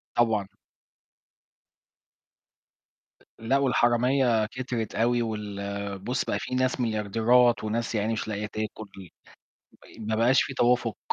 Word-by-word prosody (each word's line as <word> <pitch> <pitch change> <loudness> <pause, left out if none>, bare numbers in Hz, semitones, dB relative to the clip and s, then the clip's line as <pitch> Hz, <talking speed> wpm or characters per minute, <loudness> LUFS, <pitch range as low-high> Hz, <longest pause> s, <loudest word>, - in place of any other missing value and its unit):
طبعًا. 110 -4 +2 2.9
لأ، 115 +5 +1
والحرامية 125 -2 +2
كترت 120 -2 -4
أوي، 120 +1 +2
وال 100 -2 -4
بُص 125 +6 -2
بقى - - -1
في 125 - -4
ناس 130 0 0
مليارديرات 115 +2 +2
وناس 115 +1 -2
يا 105 - +1
عيني 110 +2 -1
مش 110 - -3
لاقية 105 0 -3
تاكل، 110 0 -6 1.0
مي - - -16
ما 110 - -1
بقاش 120 +4 +4
في 135 - -3
توافق. 120 -2 +1
115 Hz, 120 wpm, -26 LUFS, 105-125 Hz, 2.9 s, بقاش